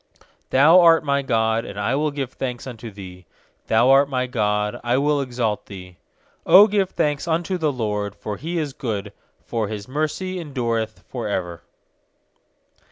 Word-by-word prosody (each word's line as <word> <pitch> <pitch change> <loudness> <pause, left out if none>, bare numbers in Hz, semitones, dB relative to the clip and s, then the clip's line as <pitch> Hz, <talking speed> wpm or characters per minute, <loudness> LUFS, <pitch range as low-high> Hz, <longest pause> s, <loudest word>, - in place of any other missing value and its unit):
28Thou 155 +7 +6
art 165 -2 +6
my 140 -1 +1
God, 115 -3 +1
and 100 -2 -8
I 105 +5 0
will 150 +3 +1
give 140 -3 -4
thanks 125 -2 -5
unto 120 -3 -8
Thee; 95 -3 -11 0.4
Thou 115 +4 +4
art 140 +1 +5
my 130 -2 -1
God, 105 -4 -1
I 120 +1 +1
will 145 +1 +1
exalt 120 -5 -2
Thee. 90 -3 -11 0.5
29Q 200 +2 +8
give 195 -3 +1
thanks 150 -2 -1
unto 170 +3 0
the 155 -3 +1
LORD, 105 -5 -3
for 100 0 -6
He 170 +4 -4
is 150 -4 -2
good, 105 -5 -4 0.3
For 115 -3 -2
His 105 0 -6
mercy 155 +7 -3
endureth 115 -8 -3
for 120 -4 -5
ever. 90 -4 -3
125 Hz, 165 wpm, -22 LUFS, 105-150 Hz, 0.5 s, 29Q